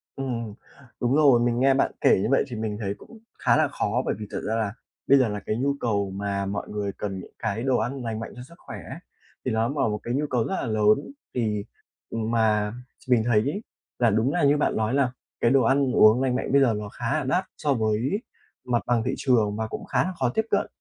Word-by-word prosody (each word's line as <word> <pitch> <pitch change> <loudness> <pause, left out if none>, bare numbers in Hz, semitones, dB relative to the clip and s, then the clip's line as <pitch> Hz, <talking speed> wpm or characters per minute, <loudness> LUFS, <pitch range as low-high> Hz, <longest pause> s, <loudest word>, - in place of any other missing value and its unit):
Ừm, 115 -5 -4 0.5
đúng 125 +3 +2
rồi, 140 -6 +6
mình 120 0 +1
nghe 135 +1 +5
bạn 135 - +2
kể - - +5
như - - 0
vậy 135 - +4
thì 120 - -6
mình 110 -1 -3
thấy 100 -1 -1
cũng 230 - -14 0.2
khá - - +3
là 155 -2 +3
khó, 125 -3 -1
bởi - - 0
vì 105 - -6
thật - - -3
ra 110 - 0
là 110 -2 -1 0.3
bây 140 - +7
giờ 130 -3 +3
là 105 0 -3
cái 110 - -1
nhu 140 +3 +1
cầu 100 -4 0
mà 100 0 -2
mọi 100 +1 -4
người 100 -1 -3
cần 95 -2 -4
những - - -11
cái 110 +1 -2
đồ 130 -2 +2
ăn 125 +4 -2
lành 110 -1 -3
mạnh 115 - -6
cho 125 - -9
sức 170 +6 -15
khỏe - - -9
ấy, - - -7 0.5
thì - - 0
ló 110 +1 +1
mở 140 -4 0
một 105 - -2
cái 120 - -3
nhu 145 +3 0
cầu 120 -3 +1
rất 190 - -2
là - - -2
lớn. 110 - +2 0.2
Thì, 105 -4 -1 0.5
ừm, 115 0 -2
mà, 105 -2 +2 0.3
ch 130 - -19
mình 115 -3 +5
thấy 115 -3 +4
ấy, 150 - -2 0.4
là 120 -2 +4
đúng 110 +6 +1
là 175 - +1
như 145 +1 +4
bạn - - +1
lói 110 +3 0
là 135 -3 +2 0.3
cái 115 - +4
đồ 135 -1 +5
ăn 135 +2 +3
uống 110 +4 +6
lành 130 -2 +1
mạnh 130 - -2
bây 140 0 +5
giờ 120 -4 +4
nó 105 -1 -4
khá 120 +8 -2
là - - -3
đắt 180 +9 0
so 145 -2 +1
với 115 - 0 0.4
mặt 120 -2 0
bằng 120 -2 +1
thị 130 - -1
trường 110 -6 +2
và 110 0 -2
cũng - - -6
khá - - +1
là 185 - -2
khó 130 -2 +2
tiếp 220 - +1
cận. 200 - +1
120 Hz, 260 wpm, -25 LUFS, 110-135 Hz, 0.5 s, bây